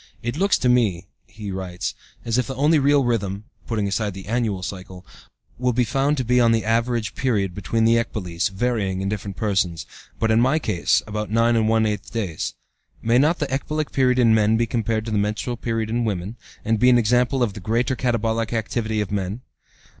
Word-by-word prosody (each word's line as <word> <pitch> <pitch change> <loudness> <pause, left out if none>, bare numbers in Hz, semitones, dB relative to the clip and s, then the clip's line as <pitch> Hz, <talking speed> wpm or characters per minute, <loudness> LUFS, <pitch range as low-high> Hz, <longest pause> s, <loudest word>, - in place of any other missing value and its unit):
"It 120 +2 -2
looks 195 +5 +2
to 125 - 0
me," 110 -8 +2 0.2
he 105 -3 -7
writes, 95 -2 -4 0.3
"as 115 +1 +1
if 125 - -1
the 135 - -5
only 150 +4 +3
real 140 0 +4
rhythm 105 -4 -1 0.2
(putting 110 -4 -1
aside 100 0 -2
the 95 - -8
annual 110 -4 -1
cycle) 95 0 -7 0.5
will 125 -1 +1
be 125 +2 +2
found 135 +5 +1
to 130 - 0
be 125 +2 +3
the 115 -2 +3
average 115 -1 0
period 105 -8 0
between 105 +4 -1
the 115 +1 +5
ecboles, 90 -7 -3
varying 100 -2 -1
in 95 - -1
different 100 -2 -5
persons, 90 -5 0 0.3
but 110 0 +1
in 110 +1 +4
my 130 +5 +3
case, 105 - +1
about 105 0 -4
nine 115 +2 +3
and 110 -1 +2
one 110 0 +3
eighth 105 -2 -3
days. 100 -9 -3 0.5
May 115 +2 +3
not 155 +5 +3
the 145 -3 -3
ecbolic 150 +2 -2
period 130 -2 +2
in 115 -3 +5
men 110 0 +3
be 115 - +2
compared 110 -1 -1
to 115 - -4
the 105 - +1
menstrual 105 +4 -2
period 115 -2 -2
in 120 +1 0
women, 100 -1 -3 0.3
and 110 0 +1
be 125 - +5
an 125 - +6
example 125 +3 +2
of 110 -4 -1
the 105 - -8
greater 115 +6 0
katabolic 115 -2 -1
activity 110 -1 -1
of 105 - -4
men? 100 +3 -3
115 Hz, 205 wpm, -22 LUFS, 105-125 Hz, 0.5 s, an